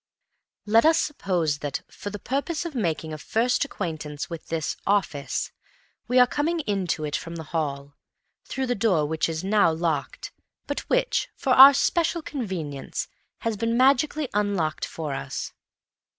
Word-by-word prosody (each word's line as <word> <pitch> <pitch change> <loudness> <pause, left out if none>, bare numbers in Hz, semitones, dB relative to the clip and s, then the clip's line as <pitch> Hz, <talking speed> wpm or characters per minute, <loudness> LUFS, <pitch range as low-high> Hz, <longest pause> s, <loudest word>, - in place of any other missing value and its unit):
Let 225 +2 +5
us 320 +1 +5
suppose 175 - -1
that, 145 -2 -4
for 205 - -7
the 205 - -6
purpose 280 - -2
of 335 - -4
making 165 - -2
a 155 - -6
first 240 - +1
acquaintance 155 - -5
with 165 -2 -7
this 160 -1 -2
"office," 175 -9 0 0.6
we 250 +2 +2
are 250 - +8
coming 315 +6 -1
into 195 - -1
it 145 -1 -2
from 165 +1 -5
the 165 - -6
hall, 140 -3 -2 0.5
through 265 - -3
the 245 - 0
door 195 -9 +2
which 160 +2 -1
is 160 +1 -3
now 200 -3 +4
locked, 160 -3 -2 0.3
but - - -2
which, - - +1
for 270 -6 -1
our 270 +2 +10
special 335 +3 +1
convenience, 180 - -4 0.3
has 230 -2 -1
been 230 +2 0
magically 275 +3 +3
unlocked 200 -7 0
for 155 -3 -5
us. 70 - -5
200 Hz, 155 wpm, -25 LUFS, 160-260 Hz, 0.6 s, our